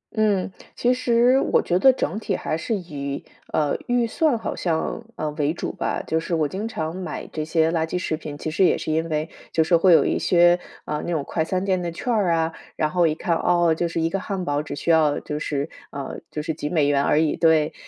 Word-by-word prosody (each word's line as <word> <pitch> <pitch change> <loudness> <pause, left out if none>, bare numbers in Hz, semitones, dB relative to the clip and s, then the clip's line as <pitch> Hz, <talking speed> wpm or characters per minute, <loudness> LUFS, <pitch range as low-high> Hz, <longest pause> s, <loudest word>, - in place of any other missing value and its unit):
嗯， 205 -4 +1 0.2
其 245 +1 +2
实 250 +1 +3
我 - - +2
觉 180 +1 +1
得 265 +5 +7
整 215 -5 -2
体 200 -4 -2
还 - - -2
是 165 +8 -2
以， 140 -7 -5 0.3
呃， 150 -2 +1
预 245 -1 +2
算 275 +2 +1
好 - - -4
像， 170 +6 -2
呃， 155 -1 -3
为 150 0 0
主 - - -3
吧。 - - -3
就 160 - 0
是 165 +1 -2
我 155 -2 +1
经 200 +8 -4
常 160 -6 -4
买 185 - -5
这 155 - -2
些 160 0 +2
垃 165 -2 +1
圾 180 - -2
食 170 -3 -1
品， 150 -2 -7
其 155 - -4
实 185 - +2
也 - - +4
是 155 - -3
因 160 +1 0
为， 155 +1 -1 0.2
就 160 - +3
是 170 - +3
会 175 +2 +5
有 165 - +6
一 - - 0
些， 175 0 +4 0.3
啊， 150 0 -2
那 175 - -3
种 155 -4 0
快 160 - -1
餐 185 +3 -2
店 185 -2 +1
的 170 -1 -3
券 240 +8 -2
儿 200 -6 +2
啊， 165 0 0 0.2
然 155 -1 0
后 175 -2 +3
一 155 - 0
看， 170 0 0
哦， 175 -2 +3
就 170 +2 -1
是 165 - -3
一 165 - +2
个 195 - -2
汉 190 -2 -4
堡， 145 0 0
只 150 - -6
需 165 - 0
要 155 -3 +3
就 150 0 -4
是 145 -1 -2 0.2
呃， 140 -1 -6
就 150 - -4
是 160 - -2
几 150 - -4
美 155 -4 +2
元 140 -1 +3
而 150 - +3
已 155 -2 +2
对。 160 -2 +3
165 Hz, 265 characters per minute, -23 LUFS, 155-185 Hz, 0.3 s, 得